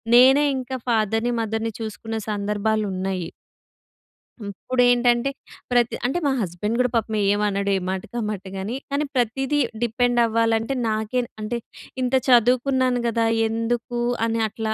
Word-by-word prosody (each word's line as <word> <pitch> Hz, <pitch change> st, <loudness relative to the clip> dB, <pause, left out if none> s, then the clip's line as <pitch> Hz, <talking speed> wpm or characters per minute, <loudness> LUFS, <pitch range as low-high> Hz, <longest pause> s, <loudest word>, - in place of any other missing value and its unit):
నేనే 265 Hz, +4 st, +7 dB
ఇంకా 260 Hz, 0 st, -4 dB
ఫాదర్‍ని, 225 Hz, +1 st, +1 dB
మదర్‍ని 225 Hz, +1 st, -2 dB
చూసుకున్న 225 Hz, 0 st, -5 dB, 0.2 s
సందర్భాలు 210 Hz, +1 st, 0 dB
ఉన్నాయి. 185 Hz, -2 st, -3 dB, 1.2 s
ఇప్పుడు 250 Hz, +5 st, -1 dB
ఏంటంటే 245 Hz, +1 st, +3 dB, 0.4 s
ప్రతి 240 Hz, -1 st, +2 dB
అంటే, 270 Hz, +8 st, 0 dB
మా 280 Hz, -, +3 dB
హస్బెండ్ 200 Hz, +5 st, -2 dB
కూడా 250 Hz, -, +3 dB
పాపం 220 Hz, -1 st, 0 dB, 0.2 s
ఏమనడు. 200 Hz, -1 st, 0 dB
ఏ -, -, -1 dB
మాటకి, 190 Hz, +5 st, -5 dB
ఆ -, -, -2 dB
మాటగాని 195 Hz, +3 st, -5 dB, 0.2 s
కానీ, 290 Hz, +1 st, 0 dB
ప్రతీదీ 265 Hz, +4 st, 0 dB, 0.2 s
డిపెండ్ 240 Hz, +1 st, +1 dB
అవ్వాలంటే 225 Hz, +2 st, +1 dB, 0.2 s
నాకే 220 Hz, +3 st, 0 dB, 0.2 s
అంటే, 235 Hz, +3 st, -2 dB, 0.4 s
ఇంత 255 Hz, +1 st, +1 dB
చదువుకున్నాను 255 Hz, +1 st, +3 dB
కదా! 230 Hz, 0 st, +1 dB, 0.2 s
ఎందుకు 235 Hz, +2 st, -2 dB, 0.3 s
అని, 230 Hz, 0 st, -1 dB
అట్లా. 220 Hz, +1 st, -3 dB
230 Hz, 130 wpm, -23 LUFS, 215-245 Hz, 1.2 s, నేనే